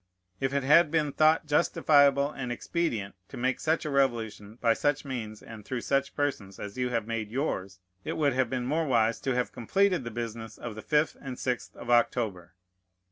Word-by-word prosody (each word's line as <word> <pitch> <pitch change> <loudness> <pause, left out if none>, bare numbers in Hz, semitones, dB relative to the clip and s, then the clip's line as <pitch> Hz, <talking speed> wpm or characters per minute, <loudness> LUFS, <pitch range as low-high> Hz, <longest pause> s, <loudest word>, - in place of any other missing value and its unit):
If 135 0 0
it 140 -1 0
had 150 +4 +6
been 150 -2 +1
thought 155 +2 +3
justifiable 145 -2 +4
and 125 -4 -5
expedient 120 - -2
to - - -10
make 130 +1 0
such 160 +1 0
a 150 - -2
revolution 115 -6 0
by 115 -1 +3
such 145 +4 0
means 110 -6 -5
and 110 -2 -10
through 125 +3 -4
such 140 +2 0
persons 105 -10 -2
as 100 -1 -7
you 125 -1 -1
have 115 -3 -1
made 115 -2 -3
yours, 100 -7 -3 0.3
it - - -3
would 145 -3 +1
have 130 -2 +1
been 125 -1 -2
more 155 +4 0
wise 115 -3 +2
to 135 -2 -1
have 125 0 0
completed 185 - +1
the 120 - -4
business 115 -1 -6
of 120 - -6
the 110 - -8
fifth 150 +4 +1
and 130 -3 -6
sixth 125 -2 -3
of 120 - -5
October. 110 -7 +1
125 Hz, 195 wpm, -28 LUFS, 115-145 Hz, 0.3 s, had